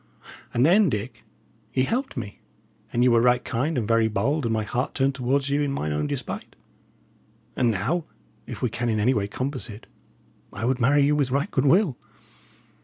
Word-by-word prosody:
And 120 Hz, +3 st, +2 dB
then, 190 Hz, +3 st, +5 dB
Dick, 110 Hz, 0 st, -5 dB, 0.5 s
ye 130 Hz, -, +3 dB
helped 255 Hz, -, -2 dB
me, 105 Hz, -4 st, -6 dB, 0.5 s
and 120 Hz, -, +2 dB
ye 125 Hz, -, +5 dB
were 120 Hz, -1 st, +4 dB
right 125 Hz, 0 st, +3 dB
kind, 130 Hz, +5 st, -1 dB
and 110 Hz, -4 st, -1 dB
very 115 Hz, -1 st, +3 dB
bold, 120 Hz, +8 st, 0 dB
and -, -, -1 dB
my 110 Hz, -1 st, 0 dB
heart 125 Hz, +4 st, -3 dB
turned 135 Hz, 0 st, +2 dB
towards 135 Hz, +1 st, 0 dB
you 145 Hz, +1 st, +2 dB
in 145 Hz, -1 st, 0 dB
mine 75 Hz, -, -2 dB
own 75 Hz, 0 st, -1 dB
despite; -, -, -5 dB, 1.0 s
and 120 Hz, -, +2 dB
now, 130 Hz, -, -1 dB, 0.4 s
if -, -, -7 dB
we -, -, +2 dB
can 120 Hz, 0 st, -2 dB
in 110 Hz, -1 st, 0 dB
any 120 Hz, +5 st, +3 dB
way 100 Hz, -4 st, -1 dB
compass 130 Hz, +5 st, -4 dB
it, 105 Hz, +1 st, -10 dB, 0.7 s
I 110 Hz, -, -4 dB
would 130 Hz, 0 st, 0 dB
marry 140 Hz, +4 st, +4 dB
you 150 Hz, +1 st, +3 dB
with 140 Hz, -3 st, +1 dB
right 140 Hz, +8 st, -1 dB
goodwill. 145 Hz, -, +3 dB
125 Hz, 190 wpm, -25 LUFS, 115-140 Hz, 1.0 s, then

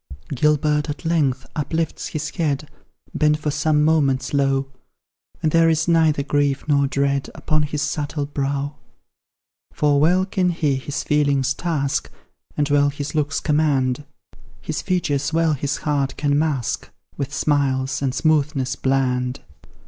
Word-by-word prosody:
Gilbert, 150 Hz, +2 st, +2 dB
at 145 Hz, +3 st, -6 dB
length, 145 Hz, -6 st, +1 dB
uplifts 160 Hz, +2 st, -2 dB
his 150 Hz, 0 st, -4 dB
head, 150 Hz, -3 st, -1 dB, 0.5 s
Bent 150 Hz, 0 st, +2 dB
for 150 Hz, -1 st, -2 dB
some 150 Hz, 0 st, +2 dB
moments 145 Hz, -5 st, +2 dB
low, 135 Hz, -1 st, +2 dB, 0.8 s
And 155 Hz, -, +2 dB
there 165 Hz, 0 st, +5 dB
is 160 Hz, 0 st, +1 dB
neither 160 Hz, -4 st, +3 dB
grief 145 Hz, 0 st, 0 dB
nor 140 Hz, -2 st, +3 dB
dread 140 Hz, 0 st, 0 dB
Upon 155 Hz, -1 st, 0 dB
his 150 Hz, -1 st, -2 dB
subtle 150 Hz, -1 st, -2 dB
brow. 140 Hz, 0 st, -3 dB, 0.9 s
For 145 Hz, -1 st, +2 dB
well 180 Hz, +5 st, +3 dB
can 185 Hz, -1 st, 0 dB
he 150 Hz, -5 st, 0 dB
his 145 Hz, +3 st, -4 dB
feelings 140 Hz, -3 st, +2 dB
task, 140 Hz, -, -1 dB, 0.5 s
And 145 Hz, -, +1 dB
well 145 Hz, 0 st, +4 dB
his 145 Hz, 0 st, -5 dB
looks 145 Hz, -2 st, 0 dB
command; 145 Hz, -3 st, +1 dB, 0.6 s
His 155 Hz, 0 st, -4 dB
features 150 Hz, -6 st, -1 dB
well 165 Hz, -1 st, +3 dB
his 140 Hz, 0 st, -2 dB
heart 140 Hz, -3 st, -1 dB
can 145 Hz, -1 st, +1 dB
mask, 145 Hz, -7 st, -1 dB, 0.3 s
With 140 Hz, -1 st, -4 dB
smiles 135 Hz, -2 st, 0 dB
and 135 Hz, -2 st, -1 dB
smoothness 150 Hz, -4 st, +1 dB
bland. 130 Hz, -1 st, 0 dB
145 Hz, 140 wpm, -21 LUFS, 140-155 Hz, 0.9 s, there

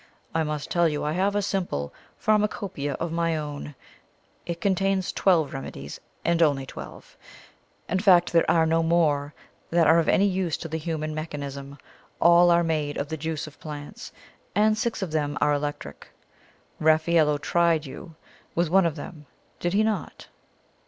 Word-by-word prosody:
I 160 Hz, -, +1 dB
must 150 Hz, -2 st, -3 dB
tell 170 Hz, -1 st, +3 dB
you 150 Hz, -1 st, -3 dB
I 150 Hz, -, -1 dB
have 195 Hz, +5 st, 0 dB
a 205 Hz, -, +1 dB
simple 175 Hz, -, -2 dB, 0.2 s
pharmacopoeia 205 Hz, -9 st, 0 dB
of 165 Hz, +5 st, -4 dB
my 165 Hz, -1 st, 0 dB
own 145 Hz, -1 st, -6 dB, 0.7 s
it 170 Hz, -1 st, -4 dB
contains 195 Hz, -1 st, +1 dB
twelve 165 Hz, -7 st, +2 dB
remedies, 70 Hz, -, -7 dB, 0.3 s
and 170 Hz, 0 st, +2 dB
only 140 Hz, -4 st, +3 dB
twelve. -, -, -10 dB, 0.7 s
In 190 Hz, -, 0 dB
fact 180 Hz, -4 st, +4 dB
there 165 Hz, -, +5 dB
me 165 Hz, -1 st, +4 dB
no 165 Hz, +1 st, +2 dB
more 155 Hz, -3 st, +1 dB, 0.3 s
that 170 Hz, -1 st, +3 dB
are 160 Hz, +2 st, +6 dB
of 165 Hz, -, +1 dB
any 200 Hz, -, +4 dB
use 185 Hz, -4 st, 0 dB
to -, -, -6 dB
the 160 Hz, 0 st, -4 dB
human 155 Hz, -1 st, -3 dB
mechanism. 140 Hz, -3 st, -6 dB, 0.4 s
All 175 Hz, +1 st, +6 dB
are 170 Hz, 0 st, +4 dB
made 155 Hz, -3 st, -1 dB
of 145 Hz, -, -3 dB
the 160 Hz, -, -2 dB
juice 160 Hz, 0 st, -4 dB
of 150 Hz, -1 st, -13 dB
plants, 145 Hz, -2 st, -8 dB, 0.4 s
and 215 Hz, +2 st, +4 dB
six 225 Hz, -2 st, -2 dB
of 180 Hz, -, -4 dB
them 150 Hz, -2 st, -1 dB
are 150 Hz, 0 st, +3 dB
electric. 145 Hz, -, -4 dB, 0.7 s
Raffaello 155 Hz, -1 st, +3 dB
tried 165 Hz, +1 st, +1 dB
you 160 Hz, +4 st, -10 dB, 0.4 s
with 170 Hz, -1 st, +1 dB
one 190 Hz, -1 st, +5 dB
of 160 Hz, -, -3 dB
them, 150 Hz, -1 st, -9 dB, 0.3 s
did 175 Hz, +1 st, -1 dB
he 210 Hz, +2 st, +3 dB
not?" 215 Hz, -6 st, -3 dB
160 Hz, 165 wpm, -25 LUFS, 150-175 Hz, 0.7 s, are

